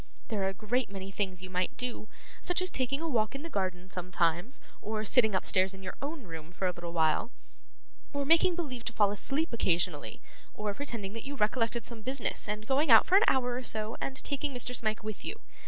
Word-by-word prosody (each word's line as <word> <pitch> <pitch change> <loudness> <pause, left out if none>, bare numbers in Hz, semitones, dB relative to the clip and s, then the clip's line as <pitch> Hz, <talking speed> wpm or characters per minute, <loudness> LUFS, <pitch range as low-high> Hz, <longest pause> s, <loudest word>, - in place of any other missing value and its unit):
There 215 -4 -1
are 190 - +2
a 195 - -1
great 225 +5 0
many 195 -1 -6
things 190 -2 -2
you 185 - -7
might 180 0 -1
do; 250 -3 -3 0.3
such 355 -1 0
as 370 -1 +1
taking 265 +3 -1
a 330 - -1
walk 225 -5 +1
in 275 - -5
the 330 - -7
garden 185 -2 -2
sometimes, 180 - 0 0.2
or 215 0 -2
sitting 220 -2 +5
upstairs 190 +1 +2
in 190 - -11
your 185 - -4
own 290 0 -4
room 165 -3 -8
for 185 +1 -3
a 180 - +3
little 175 -1 -7
while, 160 +5 +2 0.8
or 285 -1 -1
making 335 +3 +5
believe 270 -9 -4
to 240 - -2
fall 205 -2 +4
asleep 275 - 0
occasionally, 175 -7 +1 0.4
or 210 -1 -2
pretending 225 -7 -3
that 230 - -6
you 285 +1 -4
recollected 230 0 +1
some 235 -2 -8
business, 260 0 -1
and 210 +1 -3
going 275 +5 +2
out 225 -2 +9
for 370 - +3
an 405 - +7
hour 250 -2 +3
or 250 - -2
so, 220 -2 -2
and 270 - -2
taking 285 -1 -2
Mr. 245 0 -1
Smike 215 -3 0
with 215 -2 -5
you. 445 - -4
220 Hz, 220 wpm, -31 LUFS, 190-265 Hz, 0.8 s, out